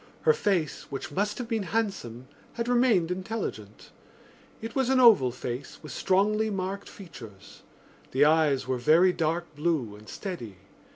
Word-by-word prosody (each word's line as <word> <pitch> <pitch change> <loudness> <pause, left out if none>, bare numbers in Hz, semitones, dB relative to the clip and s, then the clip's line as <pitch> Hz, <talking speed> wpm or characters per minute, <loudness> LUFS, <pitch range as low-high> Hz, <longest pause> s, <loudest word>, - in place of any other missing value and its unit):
Her 465 - +5
face, 185 - -1
which 140 +2 -6
must 205 +7 -1
have 245 - -5
been 225 -2 -1
handsome, 185 - -3 0.3
had 235 0 -3
remained 240 -9 +3
intelligent. 185 - -5 0.7
It 225 +1 -7
was 265 -2 0
an 265 -1 +3
oval 220 - +7
face 125 +2 -6
with - - -8
strongly 215 +3 +1
marked 195 0 -4
features. 120 - -12 0.5
The 135 +3 +3
eyes 150 -4 +3
were 130 -1 -1
very 165 +8 +5
dark 165 0 -2
blue 145 -9 -1
and 105 +1 -14
steady. 120 - -6
175 Hz, 150 wpm, -27 LUFS, 130-215 Hz, 0.7 s, oval